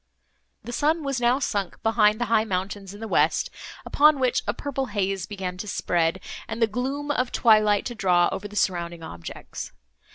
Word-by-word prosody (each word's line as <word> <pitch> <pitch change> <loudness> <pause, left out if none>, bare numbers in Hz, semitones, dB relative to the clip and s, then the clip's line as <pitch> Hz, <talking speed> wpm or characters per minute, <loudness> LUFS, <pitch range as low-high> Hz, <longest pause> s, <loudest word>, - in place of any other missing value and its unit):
The 240 - -7
sun 310 +5 +1
was 275 -3 -2
now 240 +2 +4
sunk 205 -8 -2
behind 215 -1 +3
the 240 - 0
high 225 -1 +3
mountains 195 -1 -3
in - - -11
the 225 - -4
west, - - +2 0.3
upon 300 -1 +4
which 255 -2 +2
a - - +1
purple 270 -2 -3
haze 195 -3 -2
began 190 -3 -5
to 210 - -6
spread, 175 -2 0 0.3
and 225 +1 -5
the 230 - +5
gloom 265 +6 -3
of 250 -3 0
twilight 215 -3 +4
to 240 - -3
draw 180 -5 +3
over 205 - -4
the 210 - -13
surrounding 170 -4 -1
objects. 85 - -8
215 Hz, 185 wpm, -25 LUFS, 190-245 Hz, 0.3 s, the